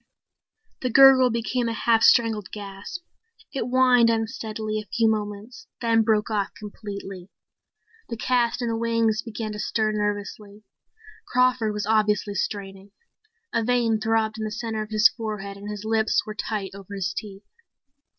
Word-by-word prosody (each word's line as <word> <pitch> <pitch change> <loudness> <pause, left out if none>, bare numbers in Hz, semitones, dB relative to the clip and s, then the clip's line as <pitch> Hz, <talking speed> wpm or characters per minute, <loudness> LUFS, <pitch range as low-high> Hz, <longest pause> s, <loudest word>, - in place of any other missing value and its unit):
The 255 - -1
gurgle 265 0 +7
became 235 +1 -1
a - - -2
half 225 0 +2
strangled 220 -4 +4
gasp. 205 - -8 0.5
It 265 -4 -2
whined 250 -2 +5
unsteadily 220 -1 -2
a 210 -2 -10
few 230 -1 +2
moments 215 - -3
then 230 -1 +3
broke 220 0 +1
off 205 -2 -1
completely. 200 -3 -8 0.8
The 230 - -4
cast 240 +1 +1
in - - -1
the 230 - -1
wings 230 -1 +1
began 220 -2 -5
to 210 - -6
stir 215 0 0
nervously. 205 0 -4 0.6
Crawford 250 -3 +2
was 210 -1 -3
obviously 210 -1 +1
straining. 195 0 -5 0.6
A 230 - +1
vein 235 -2 +1
throbbed 220 0 0
in - - -3
the 215 - -2
center 220 0 -4
of 215 - -6
his 215 +1 +6
forehead 215 -5 -6
and 200 +1 -9
his 210 0 -6
lips 220 0 +1
were 215 - -6
tight 210 -2 -4
over 200 0 -9
his 190 -1 -2
teeth. 200 0 -8
220 Hz, 155 wpm, -24 LUFS, 210-230 Hz, 0.8 s, gurgle